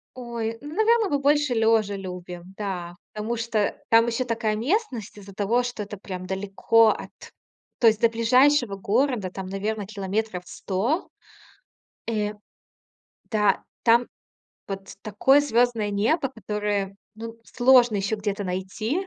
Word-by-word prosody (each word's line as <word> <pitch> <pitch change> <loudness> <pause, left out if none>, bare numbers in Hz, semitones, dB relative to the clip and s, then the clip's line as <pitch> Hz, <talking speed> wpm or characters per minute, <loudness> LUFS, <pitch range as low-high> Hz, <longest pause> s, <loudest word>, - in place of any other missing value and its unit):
Ой, 235 -2 -4
ну, 295 +2 -8
наверно, 440 +1 +3
мы 285 - +1
больше 290 -1 +2
лёжа 220 -3 +2
любим. 180 -1 -8
Да, 180 -4 -4 0.2
потому 215 +2 -3
что 225 -2 -1
там 230 +1 +5
ещё 235 +2 -1
такая 225 -2 -1
местность 250 - -2
из-за 200 -1 -11
того, 215 +5 +1
что 245 -3 -4
это 205 0 -8
прям 185 -2 -7
далеко 195 +4 +3
от, - - -3 0.7
то 235 - +5
есть 220 -1 +3
до 230 - +5
ближайшего 245 +1 +3
города, 220 +1 0
там, 190 0 -6
наверно, 205 +3 -3
100 - - -10
километров. 200 -1 -2 1.7
Э, 210 -2 -1 1.0
да, 210 -3 +2 0.2
там 235 +1 +4 0.6
вот 195 -1 -7
такое 240 +7 +4
звездное 240 -5 +1
небо, 230 +9 +1
которое, 205 -3 -3 0.2
ну, 225 +1 -8
сложно 245 -3 +4
еще 200 +2 0
где-то 205 -1 -3
найти. 205 - -3
220 Hz, 135 wpm, -25 LUFS, 200-245 Hz, 1.7 s, там